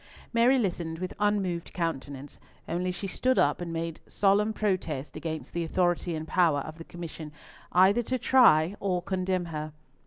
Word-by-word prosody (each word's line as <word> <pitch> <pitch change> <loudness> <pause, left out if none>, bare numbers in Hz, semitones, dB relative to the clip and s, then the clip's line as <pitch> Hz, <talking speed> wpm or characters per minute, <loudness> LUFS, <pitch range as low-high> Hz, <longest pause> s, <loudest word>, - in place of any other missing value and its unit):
Mary 240 +3 +5
listened 175 -7 -2
with 185 +2 -4
unmoved 195 -5 0
countenance, 145 -5 -4 0.3
only 180 +2 -1
she 180 - -6
stood 255 +7 0
up 145 +4 +2
and 170 -1 -4
made 165 -1 -4
solemn 205 +2 +2
protest 185 -10 -2
against 160 -1 -5
the 170 - -1
authority 175 0 0
and 155 0 -5
power 160 -6 +3
of 155 +3 -9
the - - -7
Commission 165 -3 -8 0.4
either 190 +6 +5
to 255 +2 -2
try 205 -9 +5
or 180 -3 -1
condemn 185 -1 -1
her. 155 -2 -5
175 Hz, 160 wpm, -28 LUFS, 160-195 Hz, 0.4 s, Mary